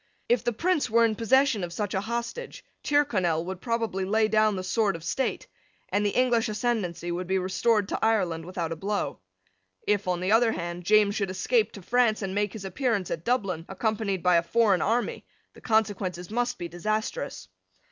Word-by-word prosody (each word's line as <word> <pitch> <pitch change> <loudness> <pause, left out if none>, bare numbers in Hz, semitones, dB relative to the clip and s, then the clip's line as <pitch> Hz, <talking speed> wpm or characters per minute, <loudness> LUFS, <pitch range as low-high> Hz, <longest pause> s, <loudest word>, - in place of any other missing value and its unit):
If 240 -1 +2
the 240 - +1
Prince 325 +3 0
were 230 +1 +5
in 225 - +1
possession 240 -1 +3
of 175 - -4
such 205 +2 -3
a 190 - 0
hostage, 235 - -5 0.2
Tyrconnel 190 - +1
would 185 0 -6
probably 230 -5 -1
lay 215 +3 +2
down 215 -1 +3
the 185 - -4
sword 205 0 +1
of 165 - -8
state; 260 +10 -2 0.4
and 205 - +1
the 205 - +2
English 245 -2 +2
ascendency 210 -6 -2
would 175 +1 -3
be 190 +1 +1
restored 195 +3 +1
to - - -3
Ireland 180 -8 +1
without 175 -2 -4
a - - -2
blow. 200 +5 -2 0.7
If, 205 -2 +1
on 180 -1 0
the 185 +3 -1
other 225 0 +4
hand, 175 0 -5
James 210 +1 +4
should 200 -2 -1
escape 435 - +1
to 200 - -10
France 235 -1 +2
and 190 -1 -3
make 205 0 0
his 210 -3 -7
appearance 205 -2 -1
at 160 - -3
Dublin, 195 -8 0
accompanied 200 -2 -1
by 180 -1 +5
a - - +4
foreign 205 +1 +2
army, 235 +3 0 0.3
the - - -16
consequences 200 -5 0
must 240 +2 -1
be 175 - -5
disastrous. 215 - -3
210 Hz, 190 wpm, -27 LUFS, 185-230 Hz, 0.7 s, were